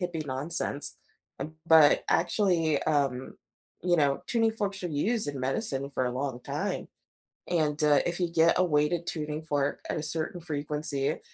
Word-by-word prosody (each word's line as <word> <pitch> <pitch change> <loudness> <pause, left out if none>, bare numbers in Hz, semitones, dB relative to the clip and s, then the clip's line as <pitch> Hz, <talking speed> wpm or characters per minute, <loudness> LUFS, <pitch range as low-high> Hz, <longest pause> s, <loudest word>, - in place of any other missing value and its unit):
hippie 165 -4 -3
nonsense, 140 +2 -2 0.4
uh, 140 - -2 0.2
but, 160 -3 +6
actually, 165 -8 +2
um, 135 -4 0 0.5
you 175 0 +3
know, 140 -3 +2
tuning 225 -2 +2
forks 200 -3 -3
are - - -1
used 210 +9 0
in 140 -2 -4
medicine 135 - -2
for 130 -2 -1
a 125 - -1
long 130 -1 -3
time, - - -3 0.6
And, 155 -3 +1
uh, 150 -1 +5
if 175 +1 -2
you 175 - +1
get 165 0 +4
a 185 - +4
weighted 155 +1 +1
tuning 150 -1 -3
fork 145 -2 -1
at - - -1
a - - -2
certain 160 +3 -3
frequency, 150 -3 -2
155 Hz, 165 wpm, -28 LUFS, 140-175 Hz, 0.6 s, but